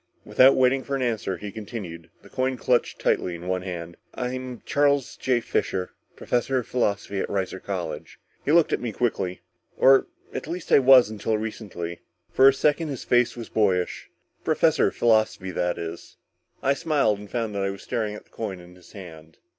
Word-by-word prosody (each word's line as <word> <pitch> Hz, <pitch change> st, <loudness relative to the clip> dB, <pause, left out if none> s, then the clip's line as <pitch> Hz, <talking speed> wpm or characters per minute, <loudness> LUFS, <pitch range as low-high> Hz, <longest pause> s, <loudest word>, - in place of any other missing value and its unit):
Without 130 Hz, +1 st, +6 dB
waiting 130 Hz, +1 st, +3 dB
for 140 Hz, -, -3 dB
an 135 Hz, -, -1 dB
answer, 110 Hz, -6 st, -1 dB
he 105 Hz, +3 st, -7 dB
continued, 100 Hz, -7 st, -8 dB
the -, -, -15 dB
coin 130 Hz, 0 st, -1 dB
clutched 125 Hz, -1 st, +1 dB
tightly 90 Hz, -, 0 dB
in 85 Hz, +1 st, -9 dB
one 90 Hz, 0 st, -1 dB
hand. 85 Hz, -2 st, -6 dB, 0.2 s
"I'm 125 Hz, -1 st, -5 dB
Charles 145 Hz, -2 st, +1 dB
J. 125 Hz, -2 st, 0 dB
Fisher, 90 Hz, -4 st, -2 dB, 0.2 s
professor 125 Hz, +2 st, 0 dB
of 125 Hz, -, -1 dB
philosophy 100 Hz, -4 st, -1 dB
at -, -, -2 dB
Reiser 95 Hz, -1 st, -2 dB
College." 90 Hz, -5 st, -5 dB, 0.2 s
He 145 Hz, -, 0 dB
looked 165 Hz, 0 st, +4 dB
at -, -, 0 dB
me 120 Hz, -3 st, -3 dB
quickly. 95 Hz, -6 st, -1 dB, 0.4 s
"Or 135 Hz, 0 st, +6 dB, 0.3 s
at -, -, -5 dB
least 170 Hz, +1 st, -6 dB
I -, -, +8 dB
was 130 Hz, -4 st, +7 dB
until 110 Hz, +1 st, -1 dB
recently." 100 Hz, -6 st, -6 dB, 0.3 s
For 135 Hz, -, +6 dB
a 135 Hz, -, +7 dB
second 150 Hz, +3 st, +1 dB
his 140 Hz, -4 st, -5 dB
face 120 Hz, 0 st, +2 dB
was 115 Hz, -, -7 dB
boyish. 95 Hz, -5 st, 0 dB, 0.3 s
"Professor -, -, +3 dB
of -, -, -4 dB
philosophy, 110 Hz, -5 st, +2 dB
that 90 Hz, -1 st, -1 dB
is." 85 Hz, 0 st, -7 dB, 0.5 s
I 140 Hz, -, +3 dB
smiled 140 Hz, -9 st, +1 dB
and 105 Hz, -1 st, -11 dB
found 115 Hz, -2 st, -2 dB
that 100 Hz, -, -2 dB
I 100 Hz, -, 0 dB
was 100 Hz, 0 st, -7 dB
staring 110 Hz, -2 st, -2 dB
at -, -, -10 dB
the -, -, -33 dB
coin 100 Hz, -5 st, -5 dB
in 90 Hz, 0 st, -14 dB
his 90 Hz, 0 st, -18 dB
hand. 80 Hz, -5 st, -12 dB
110 Hz, 190 wpm, -25 LUFS, 95-130 Hz, 0.5 s, I